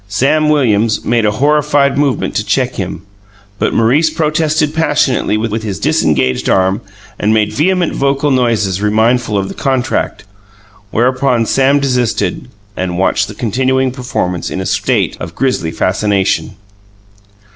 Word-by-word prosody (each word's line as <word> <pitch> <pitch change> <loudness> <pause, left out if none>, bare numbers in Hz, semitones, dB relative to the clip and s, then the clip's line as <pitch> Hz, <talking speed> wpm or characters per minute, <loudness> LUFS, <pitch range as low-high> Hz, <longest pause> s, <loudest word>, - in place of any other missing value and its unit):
Sam 140 +9 +1
Williams 115 -7 +1
made 115 -3 +2
a - - +2
horrified 145 0 +2
movement 140 -2 0
to - - 0
check - - 0
him 85 - -5 0.6
but - - +1
Maurice 135 +8 +3
protested 155 -1 0
passionately 145 -8 +1
with 110 0 -2
his 105 -3 -4
disengaged 75 - +1
arm, 95 +2 +2 0.4
and 110 +1 +2
made 105 -1 +1
vehement 180 +2 +1
vocal 140 +1 0
noises 110 -7 +1
remindful 110 +1 +1
of 95 -1 -1
the - - -7
contract; 130 -2 -2 0.7
whereupon 125 +1 +1
Sam 135 +4 +2
desisted 125 -6 -1 0.3
and 90 -1 -3
watched 95 - +1
the - - -9
continuing 130 +3 0
performance 120 -9 -3
in - - -4
a 95 - -3
state - - 0
of 85 0 -7
grisly 130 -11 -1
fascination. 100 +2 0
125 Hz, 135 wpm, -14 LUFS, 105-140 Hz, 0.7 s, Maurice